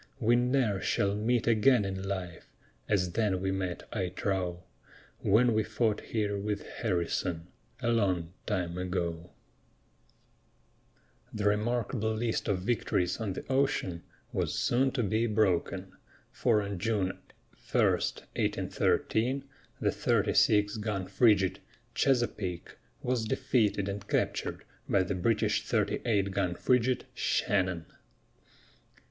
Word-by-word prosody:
We 120 -1 +4
ne'er 120 -5 +1
shall 100 0 +1
meet 110 +3 +1
again 115 0 +4
in 95 -1 -3
life 95 -3 -5 0.4
As 90 -4 +1
then 105 -2 +1
we 95 +1 -1
met, 95 -2 -3
I 95 -5 -1
trow, 90 -2 -2 0.6
When 115 +4 +4
we 110 - +3
fought 110 0 0
here 105 -3 -2
with 105 0 -3
Harrison, 85 -4 -2 0.4
A 120 - +2
long 90 -7 +1
time 90 -4 -1
ago. 90 -2 -3 2.0
The 105 -1 -3
remarkable 110 +2 +1
list 115 0 -1
of 95 -3 0
victories 95 -5 0
on 105 -4 -2
the - - -7
ocean 130 - 0 0.3
was - - -1
soon 130 +3 +2
to 125 -3 0
be 110 +3 +1
broken, 95 -3 0 0.4
for 110 -3 +2
on 100 -2 -4
June 100 -3 -1 0.5
1, - - -7
1813, 130 +5 0 0.4
the - - +1
36 105 0 +2
gun 105 -3 -2
frigate, 100 -1 +3 0.3
Chesapeake, 110 -10 0 0.3
was 125 -2 0
defeated 105 -3 +1
and 100 +1 -5
captured - - -1 0.3
by 95 - +3
the 90 - -2
British 100 +5 +1
38 100 -4 0
gun 95 -3 0
frigate, 125 +4 +1
Shannon. 90 -4 0
105 Hz, 120 wpm, -30 LUFS, 95-115 Hz, 2.0 s, We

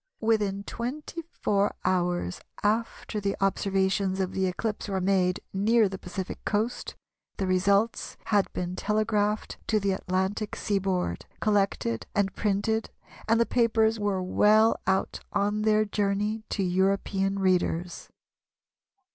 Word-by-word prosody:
Within 210 -3 +1
twenty 270 +10 -5
four 200 0 0
hours 175 - 0 0.2
after 215 0 -1
the 200 0 -1
observations 195 0 +1
of 190 -1 0
the 190 0 0
eclipse 210 +4 -3
were 195 -2 -1
made 185 -1 +1
near 215 +3 +4
the 190 0 -6
Pacific 185 +1 -6
coast, 220 +3 -2 0.4
the 195 - -1
results 200 +4 +1
had 205 -2 +2
been 180 0 -3
telegraphed 210 0 0
to 215 - +2
the 200 -1 0
Atlantic 190 +2 -1
seaboard, 195 -3 -1
collected 195 - 0
and 200 -1 +1
printed, 220 +2 0 0.4
and 225 +1 +3
the 235 - +4
papers 225 -2 +2
were 200 -3 0
well 215 +4 +4
out 190 0 +1
on 205 +1 +1
their 215 0 +3
journey 210 +1 -1
to 200 - -1
European 195 +1 +1
readers." 180 -2 0
200 Hz, 125 wpm, -27 LUFS, 190-215 Hz, 0.4 s, near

